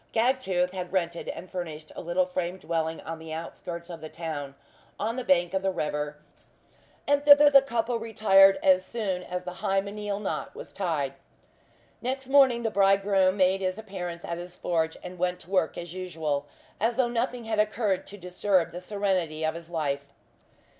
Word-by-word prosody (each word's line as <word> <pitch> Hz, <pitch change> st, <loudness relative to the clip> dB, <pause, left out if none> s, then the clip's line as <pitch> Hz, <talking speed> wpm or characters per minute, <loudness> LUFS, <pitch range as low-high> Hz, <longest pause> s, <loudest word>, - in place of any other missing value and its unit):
Gagtooth 225 Hz, -7 st, +2 dB
had 180 Hz, -2 st, -5 dB
rented 170 Hz, -3 st, -1 dB
and 185 Hz, -, -6 dB
furnished 160 Hz, -4 st, -6 dB
a -, -, -5 dB
little 175 Hz, +2 st, +1 dB
frame 180 Hz, 0 st, -3 dB
dwelling 160 Hz, -2 st, -2 dB
on 165 Hz, 0 st, -6 dB
the 160 Hz, 0 st, -9 dB
outskirts 170 Hz, +1 st, -6 dB
of 170 Hz, -3 st, -8 dB
the 155 Hz, -, -7 dB
town, 150 Hz, -5 st, -5 dB, 0.4 s
on 220 Hz, +3 st, -1 dB
the 255 Hz, -, -3 dB
bank 175 Hz, -4 st, +2 dB
of 190 Hz, -, +1 dB
the 190 Hz, -, +1 dB
river; 150 Hz, -4 st, -2 dB, 0.9 s
and 285 Hz, 0 st, +3 dB
thither 290 Hz, 0 st, +8 dB
the 275 Hz, -1 st, +9 dB
couple 235 Hz, -2 st, -1 dB
retired 200 Hz, -3 st, +5 dB
as 185 Hz, -1 st, +5 dB
soon 190 Hz, -3 st, -3 dB
as 180 Hz, 0 st, -5 dB
the 180 Hz, 0 st, -6 dB
hymeneal 200 Hz, 0 st, -1 dB
knot 205 Hz, -, -4 dB
was -, -, -10 dB
tied. 155 Hz, -8 st, -1 dB, 0.9 s
Next 260 Hz, +2 st, -3 dB
morning 265 Hz, -4 st, +5 dB
the 225 Hz, -, 0 dB
bridegroom 195 Hz, -1 st, +3 dB
made 190 Hz, 0 st, +3 dB
his 185 Hz, 0 st, -1 dB
appearance 180 Hz, -5 st, -6 dB
at 170 Hz, 0 st, -4 dB
his 175 Hz, 0 st, -8 dB
forge 165 Hz, -3 st, -1 dB
and 180 Hz, 0 st, -8 dB
went 180 Hz, 0 st, 0 dB
to 180 Hz, -, -16 dB
work 185 Hz, -5 st, +1 dB
as 170 Hz, -1 st, -6 dB
usual, 160 Hz, -6 st, -3 dB, 0.3 s
as 230 Hz, +3 st, +1 dB
though 260 Hz, -2 st, +3 dB
nothing 240 Hz, +1 st, -2 dB
had 220 Hz, -1 st, -2 dB
occurred 210 Hz, -2 st, +1 dB
to 205 Hz, -, -10 dB
disturb 180 Hz, -1 st, +1 dB
the 175 Hz, -, -6 dB
serenity 180 Hz, -5 st, -1 dB
of 155 Hz, -, 0 dB
his 170 Hz, 0 st, -9 dB
life. 140 Hz, -4 st, -2 dB
185 Hz, 180 wpm, -27 LUFS, 170-210 Hz, 0.9 s, the